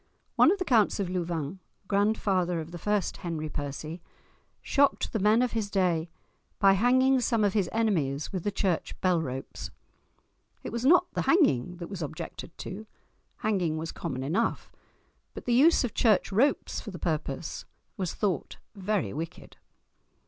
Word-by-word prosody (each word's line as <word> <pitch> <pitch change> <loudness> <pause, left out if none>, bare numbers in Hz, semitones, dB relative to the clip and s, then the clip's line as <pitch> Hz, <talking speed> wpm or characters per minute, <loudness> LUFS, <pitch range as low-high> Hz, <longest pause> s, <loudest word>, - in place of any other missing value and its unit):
One - - +6
of 405 - +1
the 370 - -3
Counts 225 -8 +3
of 195 -3 -1
Louvain, 175 -1 -3 0.3
grandfather 195 -4 +1
of 160 +1 -7
the 175 - -7
first 205 -1 0
Henry 160 -4 -4
Percy, 150 +4 -5 0.6
shocked 285 -1 +1
the 220 - 0
men 215 +5 +4
of 250 - 0
his 220 -3 -2
day 175 -4 +1 0.5
by 195 -1 +5
hanging 260 +5 +4
some 230 -3 +1
of 200 -2 +2
his 200 -5 +1
enemies 165 -12 0
with 185 -3 -3
the 205 - 0
church 190 -3 -1
bell 180 -3 +3
ropes. 130 -3 -6 0.9
It - - -5
was 235 +1 -3
not 355 +7 +6
the - - 0
hanging 180 - +3
that 170 -1 -6
was 195 -3 -7
objected 155 +2 -7
to—hanging 195 -3 -4
was 160 +1 -4
common 130 -6 -4
enough; 185 +12 -1 0.6
but - - -8
the 245 - +1
use 290 +7 +5
of 245 - -2
church 215 -4 +3
ropes 260 +9 +1
for - - -8
the 185 - -7
purpose 155 -2 -3 0.3
was 185 -3 -3
thought 190 -9 -2 0.2
very 195 - -1
wicked! 165 +3 -7
190 Hz, 160 wpm, -28 LUFS, 165-220 Hz, 0.9 s, One